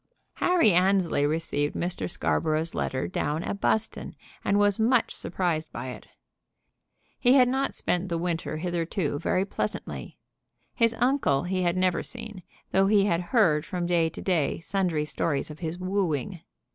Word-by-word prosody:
Harry 345 - +4
Annesley 180 -5 +3
received 150 -2 -1
Mr. 175 +1 -2
Scarborough's 160 -1 0
letter 130 -9 -2
down 150 - -2
at 200 - -4
Buston, 220 - -1 0.3
and 200 - +2
was 205 0 +3
much 235 +2 +2
surprised 170 -4 -1
by 130 - -5
it. - - -9 1.1
He 245 0 +5
had 255 -2 +6
not 265 +2 -1
spent 180 +1 -1
the 170 - -1
winter 165 -2 -2
hitherto 170 -2 -2
very 185 +5 +1
pleasantly. - - -5 0.6
His 230 -2 +2
uncle 240 - +2
he 185 +1 -1
had 175 0 +1
never 185 -1 +2
seen, 225 -5 -8 0.3
though 195 +1 +3
he 200 -1 +4
had 170 -4 +1
heard 165 -11 +3
from 175 0 -3
day 170 -2 +2
to - - -9
day 170 -7 +1
sundry 175 -4 0
stories 150 -1 -1
of 150 - -11
his 165 0 -4
wooing. 185 -2 -2
180 Hz, 155 wpm, -27 LUFS, 160-200 Hz, 1.1 s, had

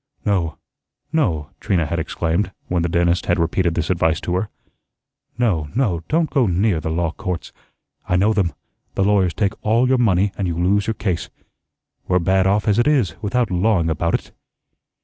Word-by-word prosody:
"No, 95 -6 0 0.6
no," 85 - 0
Trina 85 -4 0
had 85 +3 -2
exclaimed, 85 +4 -1 0.2
when 90 -1 0
the 85 - 0
dentist 85 +1 +1
had 85 - +2
repeated 85 0 +1
this 85 +1 -1
advice 80 -2 +1
to 90 - -3
her. 100 +3 -1 0.9
"No, 90 -12 0
no, 105 -10 +1
don't 160 +1 +1
go 130 -6 +3
near 95 0 +1
the 80 - -3
law 80 0 0
courts. 90 -1 -5 0.6
I 90 - +2
know 100 +5 +3
them. 95 -7 0 0.4
The 95 - +1
lawyers 95 -3 +2
take 100 -2 0
all 115 +4 +3
your 130 -1 +3
money, 100 -4 +3
and 95 - 0
you 85 -1 -2
lose 95 +4 +1
your 110 - -1
case. 90 -5 -2 0.8
We're 90 - +3
bad 95 +2 +2
off 105 +2 +1
as 105 +1 +3
it 120 - +3
is, 130 - +2
without 115 0 0
lawing 90 -3 +2
about 85 +2 0
it." - - -5
90 Hz, 185 wpm, -20 LUFS, 85-105 Hz, 0.9 s, go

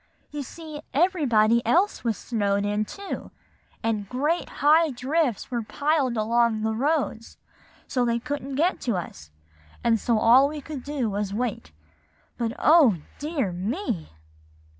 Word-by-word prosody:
You 295 - -4
see, 305 +2 -8
everybody 245 - +3
else 385 +9 +2
was 230 -3 0
snowed 200 -3 -1
in 210 +1 0
too; 400 - -7 0.5
and 215 -3 -1
great 295 +7 -1 0.2
high 315 +2 +6
drifts 260 - -1
were 240 -1 -1
piled 280 +1 0
along 225 0 +2
the 220 0 0
roads, 265 -2 -1 0.5
so 250 - 0
they 235 -1 +1
couldn't 275 +2 -4
get 335 +7 +1
to 235 -5 -1
us, 75 - -6 0.5
and 230 -2 +3
so 230 +2 +1
all 245 +5 +6
we 305 0 -6
could 290 -1 -7
do 285 -5 -2
was 205 0 -2
to 200 - -5
wait. 215 - -3 0.7
But, 230 -1 -1
oh, 305 - +6 0.2
dear 290 - -1
me!" 205 - -3
245 Hz, 145 wpm, -25 LUFS, 220-295 Hz, 0.7 s, high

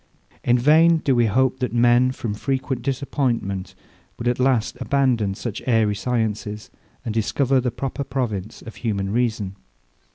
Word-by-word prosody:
In 120 0 +3
vain 160 +6 +5
do 140 -4 +1
we 120 -1 +3
hope, 130 +4 +1
that 125 -4 -2
men, 120 +2 +4
from 115 -4 -4
frequent 130 +2 -2
disappointment, 125 -8 -2 0.4
will 115 - -4
at 125 - -5
last 125 -3 +1
abandon 125 -7 +1
such 115 0 -5
airy 110 -4 +3
sciences, 105 -2 -3 0.3
and 115 - -2
discover 130 +4 +1
the 125 - 0
proper 135 +3 -4
province 115 -6 -4
of 115 - -10
human 100 -4 -2
reason. 110 -4 -1
120 Hz, 150 wpm, -22 LUFS, 110-130 Hz, 0.4 s, vain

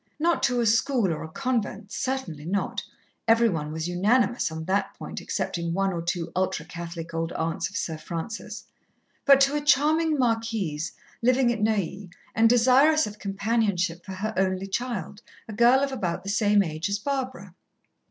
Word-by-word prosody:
Not 335 +2 +1
to 245 0 +2
a 235 - +2
school 225 - +2
or 155 - -5
a - - -5
convent, 220 -2 -2
certainly 255 - -3
not 190 +5 -2 0.5
every 230 +1 +5
one 150 -5 -3
was 160 +1 -3
unanimous 215 +4 +2
on 160 0 -5
that 195 +3 0
point - - -7
excepting 170 -1 -2
one 195 0 +1
or 170 - -3
two 170 -1 -3
ultra 185 -3 -1
Catholic 170 0 -7
old 165 +1 -2
aunts 165 +2 -2
of 195 - -5
Sir 160 -3 -3
Francis 170 +8 -6 0.6
but 275 -1 +7
to 275 +2 +4
a 295 - 0
charming 305 +2 +3
Marquise, 225 - -1 0.3
living 250 +1 +3
at 225 - -5
Neuilly, 200 -3 -1 0.2
and 225 0 +4
desirous 260 +6 +5
of 210 0 -8
companionship 195 -4 0
for 190 +1 -7
her 210 +4 -3
only 190 0 +1
child, 205 -2 -4 0.3
a 220 - -7
girl 240 +5 +5
of 280 -1 0
about 185 -10 -2
the 200 - -5
same 205 0 +3
age 160 +2 -3
as 200 - 0
Barbara. 255 -6 -4
205 Hz, 170 wpm, -26 LUFS, 175-245 Hz, 0.6 s, but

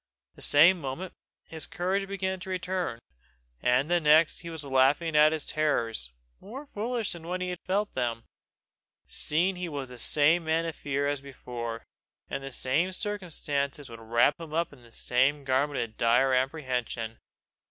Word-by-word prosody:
The - - -15
same 170 +5 +6
moment 145 +7 -5 0.3
his 160 -1 -5
courage 195 +3 -1
began 190 -1 -2
to 185 - -8
return, 185 -6 -2 0.6
and 125 +3 +3
the 175 +1 +3
next 155 0 +4
he 170 - -7
was 160 -2 -3
laughing 140 +4 +2
at 150 +1 +7
his 160 -2 -2
terrors, 115 - 0 0.3
more 260 +8 -9
foolish 225 0 0
than 165 -1 -5
when 180 +1 -2
he 180 0 -2
felt 200 +4 -2
them, 115 -2 -2 0.8
seeing 180 +5 0
he 180 -1 -4
was 140 -4 -5
the 125 -1 -7
same 155 +6 +3
man 160 +1 +1
of 165 - -4
fear 140 0 -1
as 145 -1 -1
before, 120 -4 -6 0.5
and 135 - -3
the 135 - -6
same 150 +9 +1
circumstances 150 - -2
would 115 - -9
wrap 115 +7 +2
him 160 -2 -8
in 155 -5 -2
the 120 -1 -18
same 135 +5 +1
garment 135 +2 +1
of 110 -2 -4
dire 125 +3 +3
apprehension. 125 -4 -2
150 Hz, 165 wpm, -28 LUFS, 130-175 Hz, 0.8 s, at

